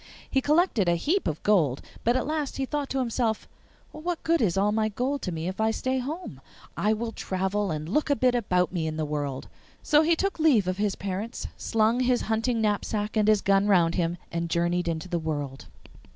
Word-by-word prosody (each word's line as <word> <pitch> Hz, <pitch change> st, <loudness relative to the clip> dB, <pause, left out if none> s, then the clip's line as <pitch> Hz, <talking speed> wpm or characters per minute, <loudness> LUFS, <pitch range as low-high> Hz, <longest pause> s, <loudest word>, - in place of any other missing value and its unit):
He 265 Hz, -, +1 dB
collected 295 Hz, -, +2 dB
a 170 Hz, -, +3 dB
heap 330 Hz, -, 0 dB
of 155 Hz, -, -3 dB
gold, 160 Hz, -11 st, +3 dB, 0.2 s
but 240 Hz, +2 st, +3 dB
at 255 Hz, -, -1 dB
last 305 Hz, -2 st, -2 dB
he 270 Hz, -, -1 dB
thought 290 Hz, 0 st, -3 dB
to 270 Hz, -, -2 dB
himself, 235 Hz, -3 st, -1 dB, 0.4 s
'What 335 Hz, +2 st, -4 dB
good 335 Hz, 0 st, +2 dB
is 195 Hz, -5 st, +1 dB
all 205 Hz, +2 st, +3 dB
my 215 Hz, 0 st, +1 dB
gold 255 Hz, +6 st, -2 dB
to 180 Hz, -, -3 dB
me 165 Hz, 0 st, -4 dB
if 190 Hz, +3 st, -3 dB
I 220 Hz, -, +3 dB
stay 260 Hz, +4 st, -1 dB
at -, -, -1 dB
home? 300 Hz, -, -6 dB, 0.3 s
I 205 Hz, +6 st, +1 dB
will 225 Hz, +1 st, -1 dB
travel 190 Hz, 0 st, -2 dB
and 155 Hz, -1 st, -3 dB
look 300 Hz, -, 0 dB
a 285 Hz, -, +4 dB
bit 250 Hz, +1 st, +2 dB
about 180 Hz, -7 st, +1 dB
me 165 Hz, -3 st, -1 dB
in 155 Hz, 0 st, -3 dB
the 155 Hz, -, -1 dB
world.' 145 Hz, -3 st, -3 dB, 0.4 s
So 300 Hz, 0 st, +5 dB
he 330 Hz, +1 st, +3 dB
took 390 Hz, +1 st, -2 dB
leave 265 Hz, -, +4 dB
of 185 Hz, 0 st, -1 dB
his 205 Hz, -1 st, 0 dB
parents, 200 Hz, +5 st, -4 dB
slung 225 Hz, +2 st, +1 dB
his 250 Hz, -1 st, +2 dB
hunting 225 Hz, +2 st, 0 dB
knapsack 210 Hz, 0 st, -1 dB
and 215 Hz, -1 st, +2 dB
his 215 Hz, -2 st, +4 dB
gun 195 Hz, +1 st, +3 dB
round 175 Hz, -5 st, +4 dB
him, 170 Hz, -1 st, 0 dB
and 170 Hz, 0 st, -2 dB
journeyed 175 Hz, +1 st, 0 dB
into 165 Hz, +1 st, -2 dB
the 175 Hz, -1 st, -1 dB
world. 145 Hz, -4 st, -4 dB
210 Hz, 220 wpm, -26 LUFS, 175-255 Hz, 0.4 s, So